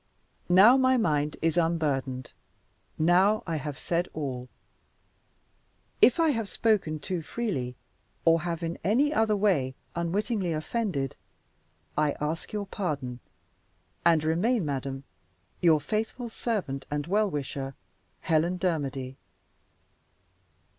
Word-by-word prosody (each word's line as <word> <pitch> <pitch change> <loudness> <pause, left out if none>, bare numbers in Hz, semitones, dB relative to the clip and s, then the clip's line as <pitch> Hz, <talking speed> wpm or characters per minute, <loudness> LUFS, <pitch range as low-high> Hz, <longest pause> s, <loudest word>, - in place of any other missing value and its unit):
"Now 200 +8 +8
my 260 0 +4
mind 150 -8 +1
is 165 0 +2
unburdened. 140 -7 0 0.7
Now 185 +6 +4
I 165 -2 -2
have 145 -1 -5
said 175 +1 -1
all. 130 -5 -4 1.5
"If 255 - +6
I 325 -1 +4
have 225 -7 -1
spoken 205 -9 +1
too 175 +3 -3
freely, 155 - -3 0.5
or 165 0 +5
have 170 0 -3
in 165 +1 -3
any 260 - +3
other 220 -5 +2
way 170 -11 +1 0.2
unwittingly 185 +2 -1
offended, 155 - -2 0.8
I 150 -1 +2
ask 155 +3 -3
your 210 -1 -3
pardon, 145 -11 -3 0.8
and 165 -2 +4
remain, 180 +7 +1
madam, 135 -1 -3 0.6
your 165 -4 +5
faithful 225 - -3
servant 195 - -3
and 145 -1 -2
well 205 +4 +2
wisher, 135 -3 -4 0.5
HELEN 165 +3 +1
DERMODY." 140 -7 -2
165 Hz, 115 wpm, -28 LUFS, 145-210 Hz, 1.5 s, Now